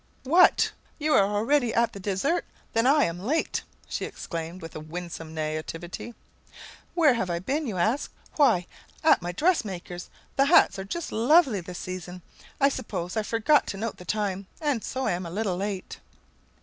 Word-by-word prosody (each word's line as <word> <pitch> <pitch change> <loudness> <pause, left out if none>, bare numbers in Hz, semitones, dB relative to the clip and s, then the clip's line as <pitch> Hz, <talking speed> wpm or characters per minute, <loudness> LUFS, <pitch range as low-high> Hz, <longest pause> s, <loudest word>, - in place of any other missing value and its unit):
"What! 340 +7 +5 0.3
You 305 -1 +1
are - - +7
already 225 +6 +1
at 230 0 +2
the 200 - -8
dessert? 205 - 0 0.3
Then 230 +2 +3
I 290 +2 +5
am 170 +1 -1
late," 275 - 0 0.3
she - - -3
exclaimed, 165 +1 -6
with 165 -2 -9
a - - -4
winsome 165 0 -7
naïveté. 160 +7 -4 0.8
"Where 315 -6 +5
have 210 -6 -1
I 170 - 0
been, 275 - -2
you 205 -5 -3
ask? 220 +10 +1 0.2
Why, 230 - +4 0.4
at 315 - +5
my 175 0 -3
dress 330 - +2
maker's. 180 -3 -7 0.3
The 275 - +5
hats 280 - +5
are 190 - -4
just 340 +12 -4
lovely 245 - +4
this 175 +1 -8
season! 180 -1 -6 0.4
I 275 - +6
suppose 185 -9 -3
I 220 - +2
forgot 225 +7 +3
to 195 - -4
note 225 +1 -3
the 180 - -11
time, 200 -1 -2
and 290 -8 0
so 260 0 -2
am 175 +1 0
a 170 - -6
little 190 0 -1
late." 195 -1 -4
205 Hz, 175 wpm, -27 LUFS, 180-270 Hz, 0.8 s, are